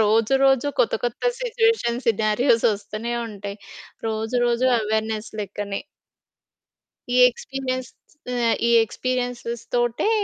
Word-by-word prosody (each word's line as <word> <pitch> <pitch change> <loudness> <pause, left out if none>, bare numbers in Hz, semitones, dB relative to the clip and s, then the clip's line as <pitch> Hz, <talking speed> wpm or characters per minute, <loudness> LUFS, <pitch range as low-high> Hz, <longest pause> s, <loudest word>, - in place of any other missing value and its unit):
రోజు, 220 +3 +3
రోజు 270 0 +4
కొత్త - - +2
కొత్త 240 -1 -3 0.2
సిట్యుయేషన్స్, 450 - +1
సినారియోస్ 220 +3 +2
వస్తూనే 215 +3 -5 0.2
ఉంటాయి. 200 -1 -7 0.5
రోజు 220 +2 -2
రోజు 240 +2 +2
అవేర్నెస్ 220 0 -2
లెక్కనే. 200 0 -4 1.3
ఈ - - +3
ఎక్స్పీరియన్స్ 255 0 -4 0.5
ఆహ్, 235 -2 +2
ఈ - - +3
ఎక్స్పీరియన్స్‌స్ 245 -1 -3
తోటే, 240 - +1
235 Hz, 105 wpm, -23 LUFS, 215-255 Hz, 1.3 s, రోజు